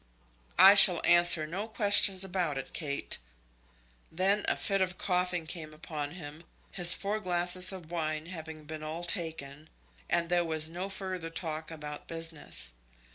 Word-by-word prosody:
"I 195 +1 +9
shall 185 -4 +8
answer 175 -2 +5
no 190 +7 -6
questions 205 -3 +2
about 180 -6 -3
it, 135 - -8
Kate." 145 -4 -4 0.9
Then 195 +5 +1
a - - 0
fit 195 -2 -1
of 185 -1 -2
coughing 180 -2 -2
came 155 -2 -9
upon 150 -2 -7
him, 155 -2 -11 0.3
his 175 -2 +7
four 205 +2 -4
glasses 180 -1 +4
of 175 -4 -10
wine 155 -2 -4
having 160 -3 -9
been 155 +1 -9
all 155 +3 -7
taken, 160 -4 -6 0.4
and 170 0 0
there 175 0 +1
was 160 -1 -3
no 180 +3 -6
further 185 -3 -6
talk 160 -1 -6
about 150 -2 -9
business. 165 - -4
170 Hz, 150 wpm, -29 LUFS, 155-185 Hz, 0.9 s, I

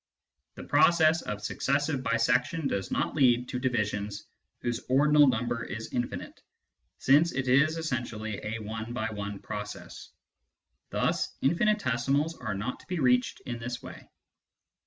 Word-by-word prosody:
The - - -8
process 165 -1 +4
of 105 0 -5
successive 140 +5 0
bisection 125 +6 +1
does 95 -6 -2
not - - -1
lead 125 -4 +3
to 125 - -3
divisions 105 -4 -2 0.4
whose 120 -1 -1
ordinal 145 +2 +5
number 120 -1 0
is 110 -1 -6
infinite, 120 -1 -4 0.6
since 150 +5 +4
it 130 0 -2
is 140 +6 +4
essentially 120 -8 -3
a 110 +1 -3
one 110 +2 -5
by 115 -2 -2
one 100 -1 -5
process. 105 +1 -7 0.8
Thus - - -1
infinitesimals 145 - +1
are 110 -4 -4
not 110 +6 -4
to - - -18
be 180 -1 -2
reached 125 -4 +2
in 120 -2 -5
this 125 +1 -5
way. - - -11
125 Hz, 135 wpm, -29 LUFS, 110-145 Hz, 0.8 s, ordinal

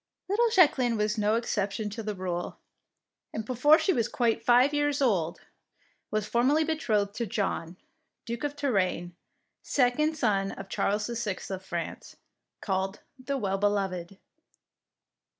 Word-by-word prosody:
Little 460 +4 +2
Jacqueline 265 - +4
was 210 +1 0
no 210 +1 +2
exception 210 -2 -1
to 225 - -5
the 210 -1 -4
rule, 180 -2 -4 0.7
and 220 - -4
before 260 +6 +5
she 380 - +1
was 230 -5 +1
quite 235 -2 0
five 250 +4 +5
years 290 -1 +1
old 185 - +1 0.7
was 215 -1 -1
formally 260 +8 +3
betrothed 220 -11 0
to 235 - -1
John, 185 -4 -2 0.5
Duke 235 +2 -5
of 290 0 -2
Tourraine, 195 -10 0 0.5
second 300 +4 +1
son 200 -7 +1
of 195 0 -9
Charles 210 +2 0
the 235 - -4
Sixth 210 -5 -4
of 190 0 -4
France, 175 -3 -5 0.5
called 190 0 -2 0.2
the 280 +1 -1
"Well 195 -5 -1
beloved." 195 -3 -1
215 Hz, 140 wpm, -28 LUFS, 195-260 Hz, 0.7 s, before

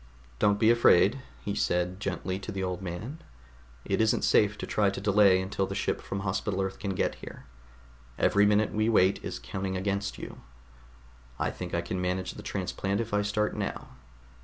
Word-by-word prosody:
"Don't 105 0 +3
be 110 +1 +5
afraid," 120 +1 +5 0.2
he 100 - -1
said 90 -2 0
gently 95 -1 -3
to 100 - -6
the 95 -1 -3
old 90 0 -3
man. 95 - -6 0.6
"It - - +1
isn't 110 -1 +2
safe 105 0 +3
to - - -5
try 105 -2 +2
to 100 - -4
delay 100 -2 +5
until 95 +1 -2
the - - -5
ship - - -1
from 95 - -4
Hospital 95 0 -2
Earth 95 0 -2
can 100 -2 -3
get - - 0
here. - - -10 0.7
Every 100 0 +4
minute 105 +1 +3
we 110 +1 +1
wait 95 -3 +3
is - - -4
counting 95 -1 -4
against 100 +1 -2
you. - - -9 1.0
I - - -1
think 90 -1 -5
I 85 - +1
can 90 +1 -4
manage 90 +1 -1
the - - -9
transplant 100 +1 -2
if 115 -2 -3
I 105 - +3
start 105 +1 0
now. - - -4
100 Hz, 185 wpm, -28 LUFS, 95-105 Hz, 1.0 s, be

